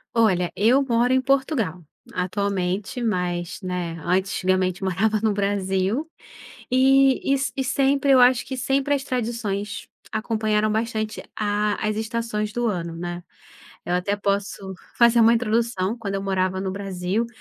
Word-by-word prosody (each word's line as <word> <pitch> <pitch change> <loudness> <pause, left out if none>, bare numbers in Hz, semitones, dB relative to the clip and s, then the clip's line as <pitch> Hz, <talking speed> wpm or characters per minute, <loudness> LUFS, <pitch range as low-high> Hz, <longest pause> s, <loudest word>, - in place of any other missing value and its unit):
Olha, 185 -6 +3
eu 235 +7 +4
moro 245 -1 +2
em 260 - +3
Portugal, 260 - 0 0.3
atualmente 195 +3 -2
mas, 180 -3 -2
né, 180 -2 -4
antigamente 185 0 0
morava 205 +4 +1
no 220 -2 +2
Brasil, 200 +6 -1 0.6
e 270 +1 +4
se 270 0 -2
sempre 275 +1 +2
eu 265 - +7
acho 250 0 +4
que 265 - -5
sempre 270 +3 +1
as 270 - -3
tradições 225 -5 -3 0.2
acompanharam 215 -1 0
bastante 220 0 -2
a 210 0 0
as 215 - -1
estações 220 -1 -2
do 240 +1 -1
ano, 170 -5 -3
né. 175 +1 -5 0.6
Eu 175 - -1
até 185 +3 0
posso 200 -1 -2 0.2
fazer 235 0 +6
uma 230 +1 +6
introdução 230 -3 0
quando 200 -3 -4
eu 195 - -3
morava 190 -1 0
no 190 -1 -3
Brasil, 195 +2 -2
210 Hz, 140 wpm, -23 LUFS, 190-235 Hz, 0.6 s, eu